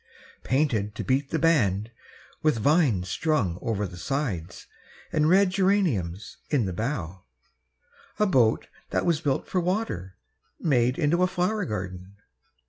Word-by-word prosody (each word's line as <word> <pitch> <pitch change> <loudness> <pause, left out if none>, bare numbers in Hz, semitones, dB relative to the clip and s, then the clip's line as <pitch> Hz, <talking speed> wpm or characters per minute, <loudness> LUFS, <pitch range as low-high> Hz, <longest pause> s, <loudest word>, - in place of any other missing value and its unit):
Painted 120 -7 0
to - - -4
beat 135 +2 0
the 160 - 0
band, 115 - +2 0.5
with 155 -5 +2
vines 125 - +2
strung 100 - 0
over 105 -2 -1
the 90 -2 -8
sides 100 - -3 0.5
And 155 0 +2
red 190 +1 +5
geraniums 175 - 0
in 135 -7 +2
the 95 - -3
bow, 95 - -4 0.9
a 210 - +3
boat 125 - +2 0.2
that - - 0
was 170 -4 +1
built 140 -2 -1
for 185 - 0
water 175 - -2 0.4
Made 125 -5 +2
into 170 +2 +2
a 185 - +4
flower 185 +3 -1
garden. 95 -2 -6
130 Hz, 135 wpm, -26 LUFS, 100-165 Hz, 0.9 s, red